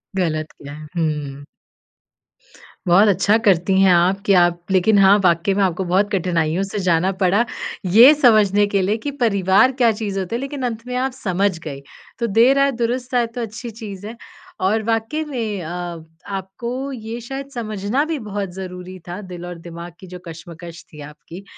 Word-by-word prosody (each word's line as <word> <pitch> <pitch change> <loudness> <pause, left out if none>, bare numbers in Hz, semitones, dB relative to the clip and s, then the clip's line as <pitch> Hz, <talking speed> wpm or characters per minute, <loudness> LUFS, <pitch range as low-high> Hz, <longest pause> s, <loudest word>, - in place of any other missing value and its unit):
गलत 155 -4 -1
किया 145 0 -11
है, 155 +1 -10
हुँ। 150 -3 -2 1.4
बहुत 195 +5 +6
अच्छा 205 +2 +3
करती 190 0 +3
हैं 190 - +5
आप 180 +3 +3
कि 200 - +4
आप 175 -1 +4
लेकिन 195 +3 +3
हाँ, 195 +1 +6
वाक़ई 175 +2 +2
में 200 - +2
आपको 185 0 0
बहुत 190 +3 +1
कठिनाइयों 175 -2 0
से 195 +1 -4
जाना 180 0 +2
पड़ा, 200 +6 +3 0.4
ये 230 +10 +8
समझने 215 -7 +4
के 200 -1 0
लिए 205 +4 0
कि 290 - -1
परिवार 200 +3 +4
क्या 245 -3 +3
चीज़ 205 -2 -3
होता 190 +4 -3
है। - - -2
लेकिन 275 0 -5
अंत 230 0 -4
में 250 - -4
आप 260 +1 0
समझ 195 -5 -1
गईं, 140 -4 -7 0.4
तो 235 - 0
देर 235 +6 +4
आए 275 0 +3
दुरुस्त 250 +2 -2
आए, 240 -1 +2
तो 230 +2 -7
अच्छी 235 +2 -6
चीज़ 205 -3 -9
है। 230 - -8 0.5
और 215 +4 +1
वाक़ई 225 +8 -1
में 225 -9 -3
अ, 175 0 -6 0.2
आपको 235 +8 -5
ये 230 -2 -6
शायद 270 +3 -7
समझना 215 +2 -2
भी 315 -2 -3
बहुत 200 -1 -3
ज़रूरी 185 0 -8
था, 180 +4 -6
दिल 180 -2 -8
और 175 -1 -7
दिमाग 170 0 -9
की 185 - -12
जो 180 0 -9
कश्मकश 165 0 -10
थी 150 - -10
आपकी 150 +5 -11
195 Hz, 185 wpm, -20 LUFS, 175-230 Hz, 1.4 s, ये